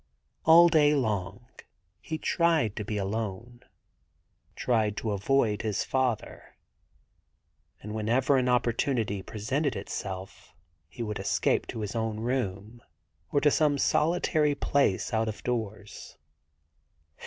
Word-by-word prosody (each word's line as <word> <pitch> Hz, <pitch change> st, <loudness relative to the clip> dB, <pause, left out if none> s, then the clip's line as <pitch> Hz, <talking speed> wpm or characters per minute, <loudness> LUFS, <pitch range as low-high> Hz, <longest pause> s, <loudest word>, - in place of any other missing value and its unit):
All 170 Hz, +2 st, +8 dB
day 150 Hz, -3 st, +4 dB
long 110 Hz, -3 st, -2 dB, 0.5 s
he 160 Hz, -, -5 dB
tried 160 Hz, -, +1 dB
to 105 Hz, -, -4 dB
be 105 Hz, +1 st, -4 dB
alone, 110 Hz, +3 st, -4 dB, 0.9 s
tried 110 Hz, -4 st, 0 dB
to 110 Hz, -, -2 dB
avoid 105 Hz, +1 st, +1 dB
his 110 Hz, -3 st, -1 dB
father; 130 Hz, -4 st, -2 dB, 1.3 s
and 105 Hz, +1 st, -6 dB
whenever 120 Hz, +6 st, +1 dB
an 125 Hz, -1 st, +1 dB
opportunity 120 Hz, -4 st, 0 dB
presented 135 Hz, +9 st, -2 dB
itself 95 Hz, -3 st, -7 dB, 0.3 s
he 120 Hz, +5 st, -6 dB
would 105 Hz, -2 st, -4 dB
escape -, -, 0 dB
to 110 Hz, -, -5 dB
his 105 Hz, +2 st, -4 dB
own 110 Hz, -1 st, -2 dB
room 115 Hz, -2 st, -3 dB, 0.5 s
or 145 Hz, -, +2 dB
to 150 Hz, -, +4 dB
some 150 Hz, -2 st, +2 dB
solitary 155 Hz, -1 st, +2 dB
place 140 Hz, -7 st, 0 dB
out 110 Hz, 0 st, +1 dB
of 110 Hz, -, -8 dB
doors. 110 Hz, -4 st, -5 dB
115 Hz, 120 wpm, -28 LUFS, 105-140 Hz, 1.3 s, All